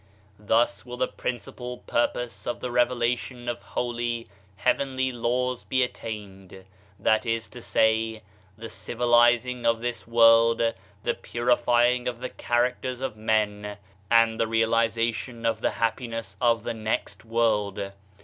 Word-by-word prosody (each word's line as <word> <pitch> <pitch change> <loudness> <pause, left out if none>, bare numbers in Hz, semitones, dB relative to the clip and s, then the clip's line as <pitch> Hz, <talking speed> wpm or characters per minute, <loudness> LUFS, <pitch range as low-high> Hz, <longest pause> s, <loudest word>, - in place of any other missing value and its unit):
Thus 105 -1 +1
will 125 +1 -8
the 130 - +1
principal 125 0 -5
purpose 120 0 -2
of 120 - -2
the 125 - -4
revela 120 0 +2
tion 120 0 -9
of 120 0 -3
holy, 120 -1 -3 0.3
heavenly 130 +5 0
laws 125 +1 -1
be 130 -1 +2
attained— 95 -6 -7 0.3
that 110 0 +2
is 115 -1 -1
to 120 - -10
say, 110 0 +1 0.3
the 115 +1 -7
civilizing 120 +1 +2
of 115 -1 +2
this 120 -4 -4
world, 115 0 +6 0.5
the 120 - +1
purifying 120 +1 +2
of 120 -1 -3
the 125 +1 -4
characters 125 +1 -1
of 130 -4 -3
men 105 -1 -1 0.3
and 115 -1 +4
the 115 - +2
realization 115 +1 0
of 115 -1 0
the - - +2
happiness 115 -3 -3
of 115 -2 +3
the 120 - -2
next 110 -1 -3
world. 105 -4 0
115 Hz, 135 wpm, -26 LUFS, 110-120 Hz, 0.5 s, world